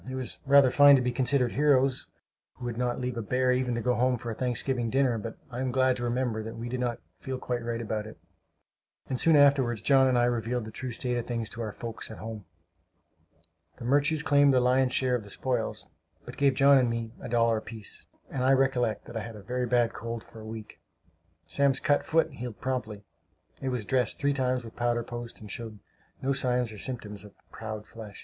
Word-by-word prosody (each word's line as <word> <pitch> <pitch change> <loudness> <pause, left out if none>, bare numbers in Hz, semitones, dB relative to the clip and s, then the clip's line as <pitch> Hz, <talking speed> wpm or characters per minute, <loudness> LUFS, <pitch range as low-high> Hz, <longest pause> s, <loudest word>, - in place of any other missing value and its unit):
It 130 - -4
was 130 -2 -5
rather 140 -2 +6
fine 145 +1 +8
to 130 - +2
be 125 - 0
considered 125 0 +1
heroes, 135 -2 +2 0.5
who 125 - -9
would 120 -1 -3
not 125 +1 -1
leave 125 -1 -3
a - - -1
bear 125 +4 +1
even 125 -1 0
to 120 - -2
go 125 +2 +1
home 125 +1 +2
to 120 - -7
a - - -2
Thanksgiving 125 0 0
dinner; 130 -2 +2
but 110 +1 -7
I 120 - -5
am 130 0 -1
glad 130 0 +3
to 120 - -5
remember 120 -2 -1
that 110 +1 -7
we 120 +1 -5
did 125 +1 -3
not 120 -2 -1 0.2
feel 130 -1 -4
quite 125 -2 -3
right 115 0 -3
about 110 -2 -3
it; - - -11 0.9
and 130 -2 -2
soon 165 -1 +4
afterward 140 -4 +5
John 135 0 +5
and 130 -1 +2
I 120 - +3
revealed 120 0 -1
the 110 - -8
true 130 +3 -6
state 125 +1 -2
of 120 - -4
things 115 -3 -3
to 115 - -6
our 110 -2 -3
folks 115 +1 -7
at 110 - -9
home. 110 -3 -7 1.3
The - - -8
Murches 145 +4 +2
claimed 145 -1 +5
the - - +5
lion's 125 +1 +3
share 130 0 +2
of 120 -3 0
the 100 - -12
spoils, 125 +2 -2 0.4
but - - -9
gave 140 -2 +2
John 140 0 +6
and 125 -2 +2
me 115 -1 -3
a - - -6
dollar 115 -1 +3
apiece; 110 -1 -8 0.2
and 130 - -2
I 135 +1 +5
recollect 130 -4 +1
that - - -11
I 115 - -2
had 115 +1 -8
a 105 - -11
very 125 +2 -2
bad 120 -1 +2
cold 115 +1 -5
for 115 - -14
a - - -10
week. 110 -1 -9 0.7
Sam's 140 -1 +2
cut 145 - +2
foot 160 -1 +2
healed 120 -4 -7
promptly. 115 -6 -3 0.6
It 135 - -2
was 125 -5 -3
dressed 125 -3 0
three 145 -1 +1
times 130 -2 0
with 115 - -11
powder 120 0 0
post, 120 0 -7
and 105 -2 -9
showed 110 -2 -6 0.5
no 135 +1 +1
sign 125 -2 +1
or 110 -4 -5
symptoms 105 -5 -2
of 105 -1 -14 0.2
"proud 110 -1 -6
flesh." 110 -3 -11
125 Hz, 225 wpm, -28 LUFS, 115-130 Hz, 1.3 s, fine